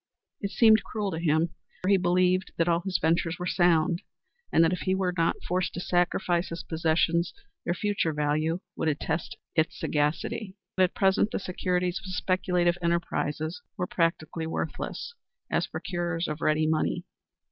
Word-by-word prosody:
It 200 - -2
seemed 220 0 +5
cruel 210 -3 -3
to 160 - -3
him, 160 0 +2 0.3
for 185 - +1
he 200 - +6
believed 180 +1 +2
that 165 - +2
all 170 -1 +3
his 185 +1 -1
ventures 165 +1 +1
were 180 - -4
sound, 175 -1 +3 0.5
and 165 - +5
that 165 +2 +3
if 180 - -2
he 190 - +1
were 185 -2 0
not 165 -1 +1
forced 180 0 -1
to - - -3
sacrifice 175 0 +1
his 165 - -5
possessions, 165 +1 +1 0.3
their 175 - 0
future 205 -5 0
value 155 +3 0
would - - -1
attest 155 +2 -2 0.2
his 160 +1 +3
sagacity. 155 +7 -1 0.2
But 185 - +5
at 180 - -5
present 195 +1 +3
the - - -2
securities 180 0 -1
of 220 - -14
speculative 180 -1 +1
enterprises 165 -2 -1 0.2
were 180 - 0
practically 165 -1 -1
worthless 160 - -4 0.4
as - - +1
procurers 175 -1 -2
of 150 +1 -4
ready 155 0 +2
money. 155 0 0
175 Hz, 165 wpm, -28 LUFS, 160-185 Hz, 0.5 s, he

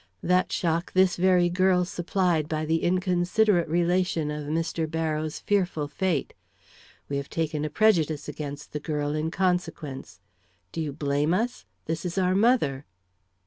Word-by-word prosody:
That 180 +1 +2
shock 170 0 -1
this 185 -1 +4
very 180 -1 +4
girl 180 0 +2
supplied 175 -3 0
by 155 0 -1
the 160 +1 +1
inconsiderate 180 +1 +2
relation 170 -1 +1
of 150 -1 -5
Mr. 165 +1 -1
Barrows' 155 -1 -2
fearful 180 -7 0
fate. 175 -1 -1 0.7
We 140 - -2
have 140 0 -5
taken 155 -2 -2
a 155 - -1
prejudice 160 -5 +2
against 145 -1 -6
the 150 - -2
girl, 150 -1 -2
in 155 +1 -1
consequence. 165 -6 -2 0.5
Do 165 - -3
you 150 -2 -2
blame 145 +3 0
us? 240 +5 -2 0.2
This 160 +1 -3
is 180 0 -4
our 185 -1 +2
mother." 190 - +2
165 Hz, 145 wpm, -26 LUFS, 150-180 Hz, 0.7 s, this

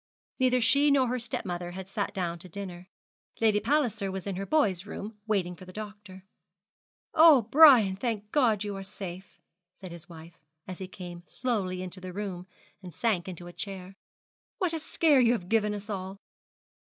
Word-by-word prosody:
Neither 255 -1 +3
she 280 +6 +4
nor 270 -3 +3
her 250 +1 -1
stepmother 180 -7 -4
had 190 0 -7
sat 200 0 -2
down 175 -4 -3
to 185 - -6
dinner. 180 -1 -7 0.5
Lady 215 -2 +3
Palliser 225 -8 0
was 190 -1 -5
in 200 -2 -3
her 195 +1 -4
boy's 205 - +1
room, 210 +1 -7
waiting 185 -5 0
for 185 - -13
the 185 - -11
doctor. 205 -2 -9 0.9
'Oh, 310 -6 +7
Brian, 235 -5 +7
thank 210 -1 -3
God 230 -8 +2
you 205 -1 -4
are 195 - -6
safe!' 190 -1 -9 0.4
said 185 -3 -10
his 170 0 -11
wife, 165 0 -13 0.3
as 185 -2 -7
he 190 - -5
came 175 -2 -9
slowly 195 -7 -2
into 185 0 -6
the 185 -1 -7
room, 185 -2 -5 0.3
and 180 -2 -9
sank 195 -3 -1
into 180 -2 -7
a 175 - -10
chair. 190 -1 -7 0.6
'What 360 -3 -1
a 325 - -2
scare 310 -2 +3
you 240 -1 +5
have 180 -7 -4
given 215 -2 +2
us 205 0 -6
all!' 190 -2 -5
200 Hz, 180 wpm, -28 LUFS, 185-230 Hz, 0.9 s, Oh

